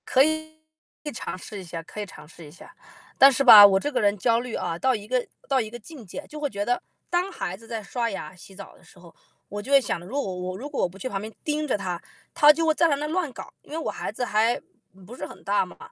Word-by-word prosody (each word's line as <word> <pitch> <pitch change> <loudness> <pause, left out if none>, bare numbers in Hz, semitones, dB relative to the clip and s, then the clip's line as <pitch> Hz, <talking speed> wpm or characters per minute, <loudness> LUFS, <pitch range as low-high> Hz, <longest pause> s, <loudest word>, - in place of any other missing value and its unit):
可 265 - +5
以 315 +1 0 0.7
尝 230 - -5
试 205 +3 -8
一 - - -8
下 170 -1 -6
可 210 - -10
以 - - -4
尝 150 -6 -13
试 165 +1 -13
一 145 - -13
下。 180 - -15 0.4
但 275 +1 +9
是 275 +1 +1
吧， 215 -6 +12
我 195 -1 +5
这 290 - -3
个 250 -3 0
人 205 0 +2
焦 230 +3 +2
虑 245 -1 -5
啊， 165 - -3
到 260 +4 +2
一 210 -1 -7
个 250 +1 0 0.2
到 270 -2 +2
一 220 - -5
个 240 - -8
境 260 0 -12
界， 245 +10 -8
就 305 - -9
会 290 -1 -1
觉 205 -3 -3
得 245 +2 0 0.3
当 355 +2 0
孩 185 - -4
子 225 +4 -16
在 225 -1 -4
刷 235 +3 -2
牙、 185 -5 -7
洗 190 +2 -14
澡 195 0 -11
的 - - -22
时 - - -20
候， 170 -1 -16 0.4
我 205 +1 -5
就 260 - -8
会 280 - +8
想 255 - -3
着， 175 - -12
如 270 +8 -3
果 190 -8 -4
我 180 +1 -5
如 275 +8 -7
果 290 - -2
我 180 - +1
不 185 - -14
去 200 - -5
旁 195 -6 -3
边 215 +1 -7
盯 300 0 -1
着 255 - +1
她， 180 -3 -4 0.3
她 295 0 +8
就 325 +2 0
会 320 - +4
在 335 +2 +3
那 295 -1 0
乱 325 -2 -1
搞， - - -10
因 - - -19
为 315 - -3
我 325 - -2
孩 - - -5
子 245 +4 -3
还 225 +2 +2 0.5
不 235 +6 -10
是 - - -6
很 - - -14
大 200 -1 +1
嘛。 180 - -14
230 Hz, 305 characters per minute, -25 LUFS, 195-280 Hz, 0.7 s, 吧